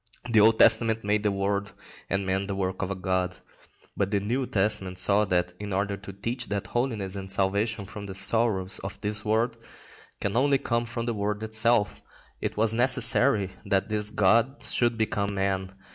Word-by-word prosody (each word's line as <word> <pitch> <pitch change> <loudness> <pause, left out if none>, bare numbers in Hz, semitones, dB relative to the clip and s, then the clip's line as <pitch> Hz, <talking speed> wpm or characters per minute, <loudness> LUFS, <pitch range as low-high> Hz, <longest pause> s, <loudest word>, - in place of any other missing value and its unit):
The 110 - +5
Old 110 +1 +5
Testament 110 -1 +4
made 105 +1 +1
the 105 -1 +1
world 100 +1 -2 0.4
and 100 0 -1
man 95 +1 -1
the 100 - -3
work 95 -1 -2
of 100 - -2
a 100 - -2
god, 90 -1 -1 0.6
but 100 -1 0
the 100 -1 +1
New 120 +6 -1
Testament 95 -2 0
saw 100 +3 +2
that, 90 -2 0
in 105 0 -6
order 100 +1 0
to 100 0 -10
teach 115 +5 -4
that 100 -1 -2
holiness 110 -6 -2
and 95 -1 -6
salvation 100 +2 0
from 100 0 -8
the 95 - -7
sorrows 100 -1 0
of 100 0 -7
this 105 +1 -2
world 115 +2 0 0.6
can 100 +1 -2
only 140 +3 +3
come 120 -3 -1
from 115 0 -4
the 120 - -1
world 105 0 -2
itself, 110 0 +1 0.4
it - - -3
was 110 0 +4
necessary 115 -5 +3
that 100 0 0
this 105 -1 -1
god 115 +6 +2
should 120 -1 +1
become 100 -2 -1
man. 95 -1 -1
105 Hz, 185 wpm, -27 LUFS, 95-115 Hz, 0.6 s, The